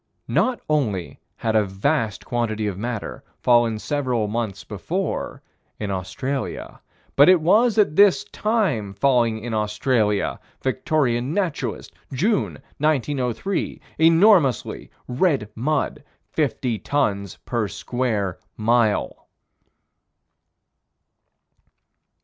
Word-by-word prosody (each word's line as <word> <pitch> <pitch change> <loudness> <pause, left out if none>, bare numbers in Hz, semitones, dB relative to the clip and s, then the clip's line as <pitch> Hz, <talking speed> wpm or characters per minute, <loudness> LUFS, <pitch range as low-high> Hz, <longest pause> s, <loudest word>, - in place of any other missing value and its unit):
Not 255 -1 +2
only 110 - -1 0.2
had 110 -1 -1
a 110 - +5
vast 105 +4 -1
quantity 110 -3 -1
of 100 -3 -2
matter 115 +2 -5
fallen 120 -2 +3
several 125 -3 -1
months 105 -3 -3
before, 160 - -4 0.4
in 105 -2 -3
Australia, 130 +9 -4 0.3
but 145 +4 +7
it 185 -1 +7
was 215 +8 +3
at 200 -8 +3
this 200 0 +5
time 180 - -1
falling 115 -2 +2
in 120 -1 -4
Australia 105 0 0 0.2
(Victorian 130 0 0
Naturalist, 185 -7 -2 0.2
June, 195 - +1 0.3
1903) 145 - -1 0.2
enormously 165 - +4 0.2
red 125 - +1
mud 150 +7 -1 0.3
fifty 120 -4 -1
tons 100 -6 -1
per 115 -4 -1
square 110 -5 -2 0.2
mile. 115 -1 +1
120 Hz, 95 wpm, -23 LUFS, 105-155 Hz, 0.4 s, but